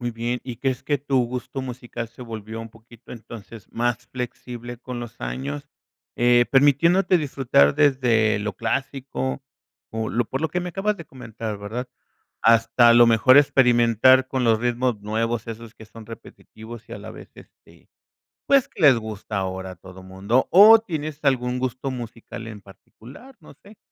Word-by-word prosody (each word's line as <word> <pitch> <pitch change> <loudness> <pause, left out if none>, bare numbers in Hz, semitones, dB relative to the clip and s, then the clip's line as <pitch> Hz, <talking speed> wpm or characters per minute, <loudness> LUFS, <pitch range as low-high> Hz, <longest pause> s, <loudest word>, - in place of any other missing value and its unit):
Muy 120 0 -3
bien, 120 +2 -3
¿y 125 -3 -7
crees 130 0 -2
que 145 -2 -1
tu 135 -3 0
gusto 125 +2 -6
musical 120 -2 -7
se 120 - -19
volvió 110 -1 -7
un 115 - -8
poquito 115 +2 -16
entonces 115 -2 -11
más 120 -1 -2
flexible 120 -1 -7
con 125 -1 -7
los 120 -1 -10
años?, 65 +4 -5 0.5
eh, 120 0 +4
permitiéndote 165 +7 +4
disfrutar 130 - +2
desde 120 -7 +2
lo 105 -2 -4
clásico 135 +2 -3 0.5
o 110 0 -3
lo 120 +1 0
por 135 +5 -5
lo 160 - -1
que 180 - -2
me 180 0 -5
acabas 200 +3 -1
de 170 - -10
comentar, 110 -4 -7
¿verdad?, 115 +5 -6 0.5
hasta 115 +1 +4
a - - +6
lo 120 0 +7
mejor 115 +3 +5
experimentar 130 -2 +4
con 130 -1 -1
los 110 -1 +2
ritmos 120 -2 -1
nuevos 115 +2 -2
esos 115 0 -9
que 110 - -14
son 110 0 -13
repetitivos 115 0 -12
y - - -10
a - - -7
la - - -10
vez, - - -13
este, - - -20 0.6
pues 275 -2 +4
que - - -11
les 140 -5 +7
gusta 110 -2 -6
ahora 95 -1 -4
a - - -11
todo 95 +1 -14
mundo 95 +7 -1
o, 215 +5 +9
¿tienes 155 -7 -6
algún 125 -2 0
gusto 130 +1 -3
musical 115 -1 -8
en 105 -2 -9
particular?, 125 - -16
no - - -16
sé, 205 +1 -16
120 Hz, 175 wpm, -23 LUFS, 110-130 Hz, 0.6 s, o